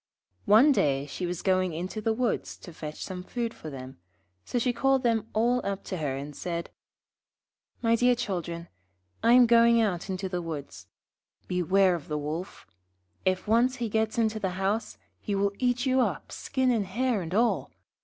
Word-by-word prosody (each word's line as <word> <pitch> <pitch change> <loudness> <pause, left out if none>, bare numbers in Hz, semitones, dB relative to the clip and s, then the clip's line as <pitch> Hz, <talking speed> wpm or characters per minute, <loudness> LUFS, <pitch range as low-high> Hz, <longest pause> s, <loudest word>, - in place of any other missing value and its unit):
One 230 +8 +7
day 140 - +2
she 175 +5 -4
was 175 0 -4
going 185 -2 +2
into 185 +6 -4
the 225 - +1
woods 235 +1 -1
to 175 - -12
fetch 155 -1 -7
some 185 -2 -5
food 230 +4 -3
for 155 - -9
them, 130 -6 -9 0.4
so - - -3
she 245 +1 +1
called 270 +2 +2
them 225 -2 +1
all 240 +3 +1
up 200 0 -3
to 185 - -4
her, 145 -5 -2
and 145 +1 -7
said 170 -1 -4 1.1
'My 230 0 +4
dear 245 +1 +4
children, 175 -7 -4 0.5
I 230 - +5
am 250 0 +8
going 235 0 +5
out 195 -4 0
into 190 0 -2
the 180 -1 -3
woods. 155 -4 -7 0.6
Beware 185 +1 +3
of 170 -4 -5
the 150 - -2
Wolf! 155 +5 -5 0.6
If 185 +1 0
once 240 +4 +3
he 240 -3 -3
gets 220 +2 0
into 220 -1 +1
the 185 -3 -2
house, 200 +4 -1 0.2
he 205 - -3
will 200 0 +1
eat 245 0 +1
you 260 0 +3
up, - - -2
skin, 260 -1 0
and 215 -5 0
hair, 235 +2 0
and 175 +2 -4
all. 235 +2 +2
200 Hz, 185 wpm, -28 LUFS, 175-235 Hz, 1.1 s, am